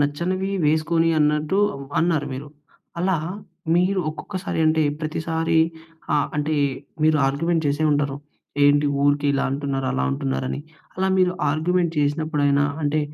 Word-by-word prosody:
నచ్చనవి 175 +7 -1
వేసుకొని 160 +2 +2
అన్నట్టు 150 +4 +1 0.4
అన్నారు 160 -3 +1
మీరు. 140 +3 -6 0.5
అలా 185 +1 +1 0.6
మీరు 185 +2 +2
ఒక్కొక్కసారి 185 +4 -5
అంటే 155 0 +3 0.2
ప్రతిసారి 160 +1 -1 0.6
ఆ - - +4 0.2
అంటే 150 +1 0 0.5
మీరు 155 0 +4
ఆర్గ్యుమెంట్ 165 +4 0
చేసే 145 +2 0
ఉంటారు. 145 -1 0 0.5
"ఏంటి 145 +1 +4 0.2
ఊరికే 145 0 +2
ఇలా 140 0 0
అంటున్నారు, 135 -1 -2
అలా 65 0 0
అంటున్నారు" 65 -1 -2
అని 65 - -3 0.4
అలా 190 0 +1
మీరు 180 -1 +3 0.2
ఆర్గ్యుమెంట్ 170 +2 +1
చేసినప్పుడైనా 145 -1 +1 0.2
అంటే 150 +1 +1
155 Hz, 130 wpm, -23 LUFS, 145-170 Hz, 0.6 s, ఆ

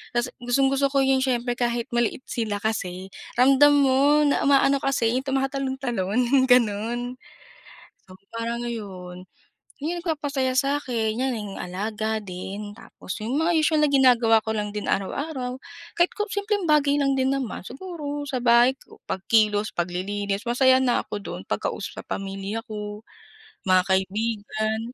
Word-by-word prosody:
Tas 240 0 +1
gustong-gusto 270 +3 +2
ko 275 - +2
yung 265 0 +3
siyempre 245 -2 0
kahit 235 -1 0
maliit 240 +1 0
sila 215 -4 -2
kasi, 190 -3 -3 0.3
ramdam 275 +3 +6
mo 280 +3 +4
na 280 - +2
umaano 275 0 +4
kasi, 240 -4 +1
yung 265 - -9
tumatalon-talon, 265 -6 -1
yung 260 -1 +4
ganun. 240 +1 +2 0.9
So, 185 - -14 0.2
parang, 235 +1 -3
ayon, 185 -6 -7 0.5
yun 320 +5 -2
ang - - -3
nagpapasaya 285 -5 -1
sa'kin, 255 -6 0
yan, 265 0 0
yung 205 -3 -6
alaga 215 +4 -3
din. 200 +2 -7
Tapos 185 - -8
yung 260 +7 0
mga 335 +2 +2
usual 310 0 +3
na 300 - +4
ginagawa 240 -5 +5
ko 220 - -1
lang 210 -1 -2
din 210 - -3
araw-araw, 255 +4 -2 0.4
kahit 345 +1 +3
ko 420 0 -2
simpleng 405 -3 -1
bagay 290 -1 +4
lang 275 -1 +2
din 265 0 +1
naman. 265 -8 -3
Siguro, 290 - -6
sa 260 - -1
bahay 240 +2 +5
ko, - - -19
pagkilos, 210 +1 +1
paglilinis, 195 +3 -2
masaya 260 +1 +5
na 245 -2 +2
ako - - -6
dun, - - -6
pagkausap - - -3
sa - - -37
pamilya 195 +2 -4
ko, 210 -1 -6 0.6
mga 185 -1 +5 0.2
kaibigan, 215 +2 -2
240 Hz, 150 wpm, -24 LUFS, 210-275 Hz, 0.9 s, ramdam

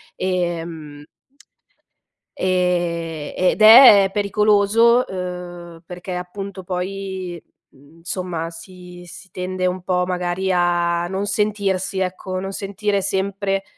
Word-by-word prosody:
ehm 170 -5 -4 1.3
ehm, 175 -4 -1
ed 185 +4 +1
è 215 -3 +9
pericoloso, 210 +3 +3
uhm, 180 -2 -7
perché 180 +1 -7
appunto 190 +2 -7
poi, 185 -1 -5 0.3
mhmm, 145 +5 -21
somma 175 -2 -4
si 180 +1 -12
si 175 +2 -13
tende 185 0 -3
un 180 0 -2
po' 180 -1 0
magari 180 +1 -2
a 175 -1 +1
non 190 +2 -3
sentirsi, 200 -2 -1
ecco, 185 0 -3
non 195 +1 -5
sentire 200 +1 -2
sempre, 195 0 -2
185 Hz, 105 wpm, -20 LUFS, 175-195 Hz, 1.3 s, è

